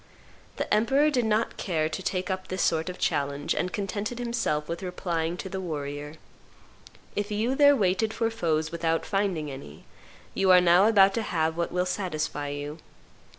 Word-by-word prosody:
The -, -, -2 dB
emperor 275 Hz, +8 st, +3 dB
did 250 Hz, -5 st, +1 dB
not 220 Hz, +1 st, 0 dB
care 160 Hz, -5 st, 0 dB
to 160 Hz, +4 st, -5 dB
take 185 Hz, 0 st, -2 dB
up 185 Hz, 0 st, -4 dB
this 185 Hz, 0 st, -1 dB
sort 160 Hz, +2 st, +1 dB
of 180 Hz, -, -6 dB
challenge, 140 Hz, 0 st, -1 dB
and 180 Hz, +4 st, -2 dB
contented 205 Hz, +3 st, -3 dB
himself 235 Hz, -11 st, -1 dB
with 170 Hz, 0 st, -4 dB
replying 175 Hz, -2 st, -2 dB
to 190 Hz, -, -5 dB
the 190 Hz, 0 st, -4 dB
warrior, 150 Hz, -3 st, -5 dB, 1.0 s
"If 205 Hz, 0 st, -2 dB
you 220 Hz, +4 st, 0 dB
there 285 Hz, +1 st, +6 dB
waited 205 Hz, 0 st, +1 dB
for 225 Hz, 0 st, -1 dB
foes 160 Hz, -7 st, -1 dB
without 165 Hz, -1 st, -1 dB
finding 190 Hz, -7 st, -1 dB
any, 105 Hz, -, -10 dB, 0.5 s
you 195 Hz, -1 st, +1 dB
are 180 Hz, -1 st, +9 dB
now 180 Hz, +3 st, +5 dB
about 195 Hz, -3 st, +6 dB
to 230 Hz, -, 0 dB
have 160 Hz, -6 st, 0 dB
what 170 Hz, 0 st, -2 dB
will 180 Hz, 0 st, 0 dB
satisfy 155 Hz, -6 st, -2 dB
you. 145 Hz, +2 st, -5 dB
180 Hz, 175 wpm, -27 LUFS, 160-205 Hz, 1.0 s, are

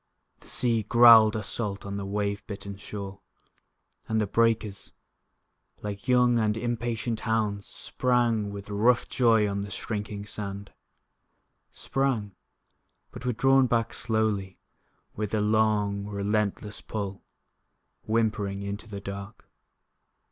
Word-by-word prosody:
The -, -, -16 dB
sea 115 Hz, -3 st, +1 dB
growled 115 Hz, 0 st, +7 dB
assault 105 Hz, -2 st, -3 dB
on 100 Hz, 0 st, -4 dB
the 100 Hz, -1 st, -4 dB
wave 100 Hz, 0 st, -2 dB
bitten 100 Hz, -2 st, -6 dB
shore. 100 Hz, 0 st, -7 dB, 0.9 s
And 110 Hz, 0 st, +1 dB
the 105 Hz, -, +2 dB
breakers, 110 Hz, -1 st, 0 dB, 0.9 s
Like 105 Hz, +3 st, -6 dB
young 125 Hz, -1 st, +4 dB
and 105 Hz, -1 st, +1 dB
impatient 120 Hz, -1 st, -2 dB
hounds, 110 Hz, -3 st, -1 dB
Sprang, 120 Hz, -5 st, 0 dB
with 100 Hz, 0 st, -8 dB
rough 115 Hz, +4 st, +3 dB
joy 115 Hz, -4 st, +3 dB
on 100 Hz, 0 st, -2 dB
the 100 Hz, -, -5 dB
shrinking 105 Hz, +1 st, -4 dB
sand. 100 Hz, -1 st, -6 dB, 1.0 s
Sprang 125 Hz, -7 st, -1 dB, 0.8 s
but 125 Hz, -, -7 dB
were -, -, +3 dB
drawn 135 Hz, +3 st, +4 dB
back 115 Hz, -1 st, 0 dB
slowly, 110 Hz, -5 st, -1 dB, 0.6 s
With 105 Hz, 0 st, -2 dB
a -, -, +1 dB
long, 105 Hz, -1 st, +1 dB
relentless 105 Hz, 0 st, -2 dB
pull, 100 Hz, -3 st, -5 dB, 0.9 s
Whimpering, 105 Hz, -3 st, 0 dB
into 100 Hz, +2 st, -6 dB
the 100 Hz, -1 st, -6 dB
dark. 100 Hz, +2 st, -8 dB
105 Hz, 120 wpm, -27 LUFS, 100-115 Hz, 1.0 s, growled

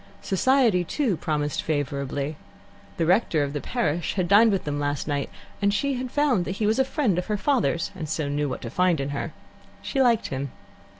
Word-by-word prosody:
Society, 225 Hz, -2 st, +3 dB
too, 235 Hz, -, 0 dB
promised 150 Hz, -3 st, -1 dB
favourably. 145 Hz, 0 st, -2 dB, 0.6 s
The 165 Hz, -, +1 dB
rector 175 Hz, -4 st, +3 dB
of 140 Hz, 0 st, -3 dB
the 145 Hz, -, -3 dB
parish 170 Hz, -8 st, -1 dB
had 185 Hz, -3 st, 0 dB
dined 215 Hz, +4 st, +6 dB
with 195 Hz, -, 0 dB
them 145 Hz, -1 st, -3 dB
last 145 Hz, 0 st, -2 dB
night, 145 Hz, -2 st, -1 dB, 0.3 s
and 200 Hz, 0 st, +3 dB
she 275 Hz, +6 st, 0 dB
found 265 Hz, -7 st, +2 dB
that 185 Hz, -, -2 dB
he 215 Hz, -, 0 dB
was 220 Hz, +4 st, +2 dB
a -, -, +6 dB
friend 260 Hz, -, 0 dB
of 180 Hz, -, -5 dB
her 210 Hz, -1 st, 0 dB
father's, 230 Hz, -, +1 dB
and 160 Hz, -5 st, -5 dB
so 155 Hz, -2 st, -1 dB
knew 145 Hz, 0 st, -1 dB
what 125 Hz, -, -5 dB
to -, -, -5 dB
find 180 Hz, -4 st, +2 dB
in 135 Hz, +1 st, -2 dB
her. 140 Hz, -1 st, -3 dB, 0.5 s
She 270 Hz, -, 0 dB
liked 240 Hz, -4 st, +3 dB
him. 135 Hz, 0 st, -4 dB
175 Hz, 200 wpm, -25 LUFS, 145-220 Hz, 0.6 s, dined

